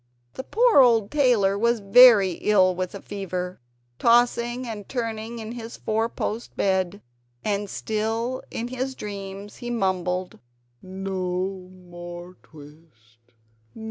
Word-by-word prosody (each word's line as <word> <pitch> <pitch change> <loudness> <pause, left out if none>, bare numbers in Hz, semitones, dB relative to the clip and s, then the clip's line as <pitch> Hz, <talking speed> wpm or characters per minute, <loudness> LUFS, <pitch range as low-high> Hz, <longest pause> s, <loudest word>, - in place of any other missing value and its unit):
The 260 - -6
poor 465 - +4
old 230 -5 +3
tailor 235 -9 +3
was 235 +1 +2
very 205 -1 +7
ill 185 +1 +3
with 185 +1 -4
a 200 - -9
fever, 185 -2 -5 0.4
tossing 240 +1 +2
and 215 -4 -7
turning 230 -2 -4
in 220 -1 -7
his 235 -1 -8
four 225 +1 -1
post 225 +1 -5
bed; 190 0 0 0.4
and 205 -1 -1
still 225 +5 -2
in 235 +1 -4
his 260 +1 -4
dreams 200 -1 -8
he 240 - -6
mumbled: 185 -4 -2 0.4
"No 185 0 -4
more 175 0 -10
twist! 145 -7 -18
205 Hz, 120 wpm, -24 LUFS, 185-235 Hz, 0.4 s, very